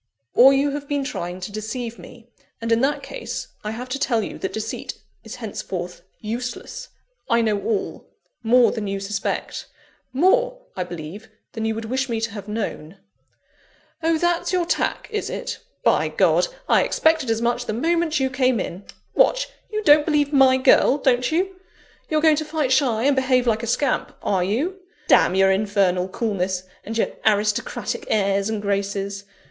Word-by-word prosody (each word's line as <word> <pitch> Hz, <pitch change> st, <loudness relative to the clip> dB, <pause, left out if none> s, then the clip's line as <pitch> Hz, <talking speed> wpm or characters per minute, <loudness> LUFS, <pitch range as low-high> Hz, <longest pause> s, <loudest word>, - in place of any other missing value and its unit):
"Or 260 Hz, +3 st, +8 dB
you 275 Hz, +1 st, +2 dB
have 285 Hz, 0 st, -5 dB
been 285 Hz, -1 st, -1 dB
trying 180 Hz, -9 st, -5 dB
to 185 Hz, -, -5 dB
deceive 225 Hz, +2 st, -5 dB
me; 235 Hz, -1 st, -13 dB, 0.3 s
and 230 Hz, 0 st, -3 dB
in 230 Hz, +1 st, +3 dB
that 280 Hz, +2 st, 0 dB
case, -, -, -6 dB
I 210 Hz, -, -3 dB
have 240 Hz, +4 st, -5 dB
to 275 Hz, +2 st, -3 dB
tell 230 Hz, -5 st, +1 dB
you -, -, -7 dB
that 190 Hz, -, -3 dB
deceit 220 Hz, 0 st, -5 dB, 0.3 s
is 225 Hz, +2 st, -8 dB
henceforth 185 Hz, -7 st, -6 dB, 0.2 s
useless. 245 Hz, -, -5 dB, 0.4 s
I 235 Hz, 0 st, +4 dB
know 210 Hz, -3 st, 0 dB
all 210 Hz, 0 st, -3 dB, 0.3 s
more 240 Hz, +1 st, +5 dB
than 215 Hz, -3 st, -4 dB
you 195 Hz, 0 st, -2 dB
suspect: 195 Hz, 0 st, -3 dB, 0.4 s
more, -, -, +2 dB, 0.2 s
I 185 Hz, -, -1 dB
believe, 175 Hz, +5 st, -8 dB, 0.2 s
than 220 Hz, -1 st, -4 dB
you 220 Hz, 0 st, 0 dB
would 225 Hz, 0 st, -5 dB
wish 260 Hz, +3 st, -1 dB
me 230 Hz, -1 st, -1 dB
to 225 Hz, -1 st, -2 dB
have 200 Hz, -1 st, -8 dB
known." 200 Hz, -5 st, -4 dB, 1.0 s
"Oh, 325 Hz, 0 st, +2 dB
that's 345 Hz, +1 st, 0 dB
your 360 Hz, -2 st, +1 dB
tack, -, -, -1 dB
is 425 Hz, -, -2 dB
it? -, -, -5 dB, 0.2 s
By -, -, +3 dB
God, -, -, +3 dB, 0.2 s
I -, -, +5 dB
expected 315 Hz, -5 st, +2 dB
as 225 Hz, 0 st, +1 dB
much 240 Hz, +1 st, -1 dB
the -, -, -1 dB
moment 325 Hz, +5 st, +1 dB
you 265 Hz, -1 st, 0 dB
came 255 Hz, -3 st, +2 dB
in! 185 Hz, +1 st, -5 dB, 0.3 s
What! -, -, +2 dB, 0.2 s
you 430 Hz, 0 st, -2 dB
don't 295 Hz, -4 st, +7 dB
believe 295 Hz, -2 st, +2 dB
my 265 Hz, -2 st, +6 dB
girl 260 Hz, +1 st, +5 dB
don't 250 Hz, -2 st, +2 dB
you? 375 Hz, +3 st, 0 dB, 0.5 s
You're 310 Hz, -1 st, +1 dB
going 310 Hz, -1 st, +5 dB
to 310 Hz, -, -1 dB
fight 305 Hz, -3 st, -1 dB
shy, 245 Hz, -5 st, +2 dB
and 280 Hz, +1 st, +3 dB
behave 255 Hz, -1 st, +2 dB
like 225 Hz, -2 st, +1 dB
a 235 Hz, -, -4 dB
scamp 265 Hz, +3 st, 0 dB
are 190 Hz, -3 st, +1 dB
you? 285 Hz, -, -1 dB, 0.3 s
Damn 185 Hz, -, +5 dB
your 195 Hz, 0 st, +5 dB
infernal 190 Hz, -2 st, +1 dB
coolness 190 Hz, -3 st, -2 dB, 0.2 s
and 225 Hz, +2 st, -5 dB
your -, -, +1 dB
aristocratic 215 Hz, -, 0 dB
airs 200 Hz, -1 st, +1 dB
and 215 Hz, -2 st, -3 dB
graces! 200 Hz, 0 st, -2 dB
235 Hz, 175 wpm, -22 LUFS, 205-285 Hz, 1.0 s, Or